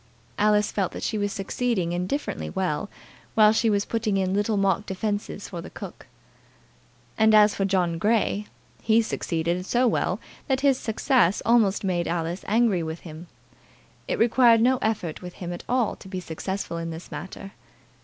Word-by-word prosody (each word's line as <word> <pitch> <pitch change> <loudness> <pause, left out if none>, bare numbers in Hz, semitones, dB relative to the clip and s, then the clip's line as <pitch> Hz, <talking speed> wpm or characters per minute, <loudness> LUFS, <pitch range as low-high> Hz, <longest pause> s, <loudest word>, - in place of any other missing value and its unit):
Alice 210 0 +3
felt 195 -3 -1
that - - -6
she 215 - -1
was 205 0 -1
succeeding 195 -2 -1
indifferently 180 +12 -3
well 190 -1 -2 0.5
while 215 -1 +6
she 225 0 +2
was 205 -1 +1
putting 220 -3 -1
in 190 -1 0
little 205 +1 +1
mock 195 +1 +1
defences 205 +1 -3
for 175 -3 -6
the - - -9
cook. - - -10 1.1
And 220 0 +6
as 210 0 +6
for 195 - -1
John 180 -4 0
Grey, 210 0 +1 0.3
he 225 +1 +3
succeeded 170 -3 -2
so 245 +6 +2
well 225 - 0 0.3
that 265 -2 +1
his 275 -2 +3
success 220 - +2
almost 220 -4 +3
made 175 -3 0
Alice 170 +2 -2
angry 220 -4 +2
with 160 0 -5
him. 160 +1 -10 0.8
It - - -1
required 235 0 +5
no 250 +3 +3
effort 200 -8 -2
with 180 -1 -9
him 175 -1 -5
at 175 - -8
all 245 -3 +1
to - - -13
be 190 -1 -4
successful 180 +1 -4
in 165 0 -4
this 165 +1 -8
matter. 195 +2 -7
200 Hz, 170 wpm, -25 LUFS, 180-220 Hz, 1.1 s, while